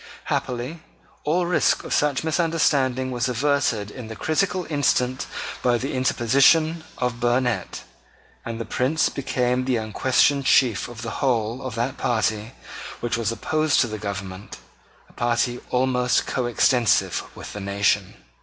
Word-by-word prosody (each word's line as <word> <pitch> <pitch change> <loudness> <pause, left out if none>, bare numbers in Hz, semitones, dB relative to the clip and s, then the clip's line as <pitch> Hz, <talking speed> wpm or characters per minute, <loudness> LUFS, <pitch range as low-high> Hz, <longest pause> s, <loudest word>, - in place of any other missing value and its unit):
Happily 125 +7 -3 0.4
all 170 +4 +1
risk 175 0 +2
of - - -4
such 145 -2 +1
misunderstanding 145 -6 +1
was 125 0 -1
averted 125 -5 0
in 125 -1 -8
the 110 - -7
critical 180 - 0
instant 130 -3 0 0.3
by 120 -1 +2
the 135 +4 -4
interposition 140 +6 +3
of 125 -1 -2
Burnet; 120 -4 0 0.6
and 115 0 -5
the 115 - -4
Prince 135 +8 +1
became 125 -2 -1
the 130 -1 +1
unquestioned 130 +5 +2
chief 120 -6 +3
of 120 -1 -9
the 115 - -5
whole 120 -2 0
of 130 -4 -5
that 120 +4 -2
party 110 -1 0 0.5
which 120 -1 -1
was 115 -1 -1
opposed 155 +5 +1
to 120 - +1
the 110 -1 -6
government, 100 -1 -6 0.5
a - - -22
party 120 +1 0
almost 125 -1 +1
coextensive 120 -1 +2
with - - -9
the 105 - -6
nation. 100 0 0
125 Hz, 140 wpm, -23 LUFS, 115-140 Hz, 0.6 s, interposition